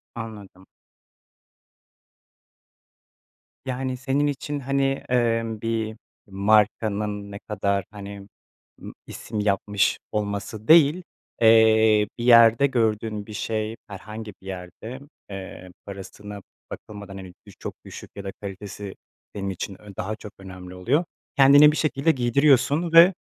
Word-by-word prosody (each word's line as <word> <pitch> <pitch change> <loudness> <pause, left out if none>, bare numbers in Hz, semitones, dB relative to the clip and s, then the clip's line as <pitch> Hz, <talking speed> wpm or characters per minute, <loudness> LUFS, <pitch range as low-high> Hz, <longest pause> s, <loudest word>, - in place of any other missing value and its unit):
Anladım. 105 -5 -9 3.0
Yani, 130 0 -3
senin 135 +3 0
için, 145 +1 -3
hani, 140 +1 0 0.3
emm, 115 -3 0
bir 115 -1 -2 0.3
markanın 105 0 +1
ne 100 - -7
kadar, 100 -2 -2
hani, 100 -1 -9 0.5
ımm, - - -9
isim 110 -1 -6
yapmış 100 -1 +1
olması 105 +1 -4
değil, 160 +2 +6 0.4
eee, 110 -1 +5
bir 120 - -5
yerde 115 +2 +7
gördüğün 110 -4 -1
bir 105 - -10
şey, 110 +1 -3
herhangi 105 +2 -8
bir 95 - -14
yerde, 95 +7 -8 0.3
eee, 95 -2 -9
parasına 100 +1 -9 0.3
bakılmadan, 100 -2 -9
hani, 95 -2 -10
düş - - -15
çok - - -6
düşük - - -10
ya 100 - -7
da 95 - -5
kalitesi 100 0 -7 0.4
benim 100 -1 -3
için 95 +1 -6
ön 105 -1 -12
daha 105 +4 -3
çok 105 -1 -11
önemli 95 -1 -10
oluyor. 135 - +1 0.3
Kendini 145 +2 +8
bir 155 - -4
şekilde 155 0 +1
giydiriyorsun 140 +5 +2
ve, 170 +3 +8
110 Hz, 120 wpm, -24 LUFS, 100-125 Hz, 3.0 s, Kendini